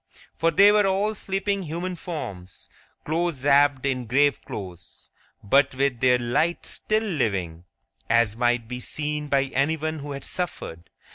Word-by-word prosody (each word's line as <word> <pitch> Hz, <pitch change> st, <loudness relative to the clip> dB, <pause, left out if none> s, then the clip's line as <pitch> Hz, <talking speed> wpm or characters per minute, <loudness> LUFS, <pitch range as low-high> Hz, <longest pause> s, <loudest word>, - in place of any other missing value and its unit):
For 165 Hz, -, +2 dB
they 200 Hz, +6 st, +6 dB
were 210 Hz, -1 st, +3 dB
all 200 Hz, +3 st, +1 dB
sleeping 195 Hz, 0 st, -2 dB
human 175 Hz, +2 st, -4 dB
forms, 100 Hz, -, -7 dB, 0.4 s
close 160 Hz, -3 st, -1 dB
wrapped 145 Hz, -1 st, +4 dB
in 130 Hz, -3 st, -1 dB
grave 140 Hz, +4 st, +2 dB
clothes, 90 Hz, -3 st, -10 dB, 0.3 s
but 135 Hz, +6 st, +3 dB
with 135 Hz, -2 st, 0 dB
their 125 Hz, 0 st, +4 dB
light 135 Hz, +8 st, 0 dB
still 215 Hz, +1 st, -1 dB
living, 95 Hz, -, -2 dB, 0.4 s
as 115 Hz, -2 st, +3 dB
might 120 Hz, -1 st, +1 dB
be 125 Hz, +1 st, -5 dB
seen 150 Hz, +3 st, -3 dB
by 140 Hz, -1 st, +2 dB
anyone 155 Hz, +2 st, 0 dB
who 145 Hz, 0 st, -6 dB
had 140 Hz, -, -6 dB
suffered. 85 Hz, -, -4 dB
140 Hz, 145 wpm, -24 LUFS, 120-170 Hz, 0.4 s, they